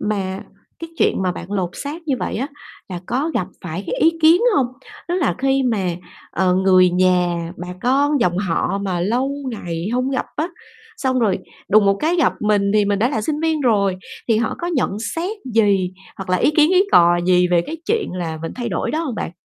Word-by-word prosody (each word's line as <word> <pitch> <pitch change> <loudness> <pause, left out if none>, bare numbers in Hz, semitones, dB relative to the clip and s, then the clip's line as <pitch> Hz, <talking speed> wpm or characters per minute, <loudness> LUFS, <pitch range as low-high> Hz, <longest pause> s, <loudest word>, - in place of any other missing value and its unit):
mà 195 -2 -2 0.4
cái 330 0 -8
chuyện - - +2
mà 180 -1 0
bạn 180 +3 -8
lột 185 -3 -1
xác 305 +4 -6
như 275 - +3
vậy - - -3
á 270 +6 -2 0.4
là 180 -2 -5
có 275 +8 -1
gặp 180 - 0 0.2
phải 175 +3 -5
cái - - -2
ý 325 - +6
kiến 330 +5 +6 0.2
hông? 265 -3 +3 0.4
Tức 350 - 0
là 365 - +1
khi 270 0 +2
mà, 220 -7 0 0.4
ờ, 180 0 +1
người 185 -1 +5
nhà, 180 -2 +1
bà 175 0 -7
con 280 +2 +2
dòng 180 -4 +1
họ 195 +1 -1
mà 185 -3 -2
lâu 245 +9 0 0.2
ngày 175 -5 -4
hông 255 +2 0
gặp 260 - -1
á, 320 +4 -1 0.5
xong 260 -1 0
rồi 205 -6 +1 0.3
đùng 210 0 +5
một 195 - +4
cái 335 +3 +1
gặp 335 - +3
mình 205 -1 +2
thì 210 -1 +4
mình 200 0 0
đã 235 - +2
là 230 -6 -1
sinh 300 +7 -2
viên 320 -2 0
rồi, 200 -7 +2 0.3
thì 225 - +4
họ 225 +1 0
có 345 - -3
nhận 260 - -1 0.2
xét 370 +6 -2 0.2
gì, 200 -5 +3 0.3
hoặc 190 -2 -6
là 185 - +3
ý 185 - +3
kiến 305 +2 +5
ý 375 +1 +5
cò 175 0 +6
gì 180 -1 +4
về 175 -1 +3
cái 325 - -5
chuyện 450 -1 0
là 165 -3 -4
mình 165 - -4
thay 240 -1 -3
đổi - - -2
đó 310 - -1
hông 260 - -3
bạn? 185 - -4
210 Hz, 220 wpm, -20 LUFS, 185-275 Hz, 0.5 s, ý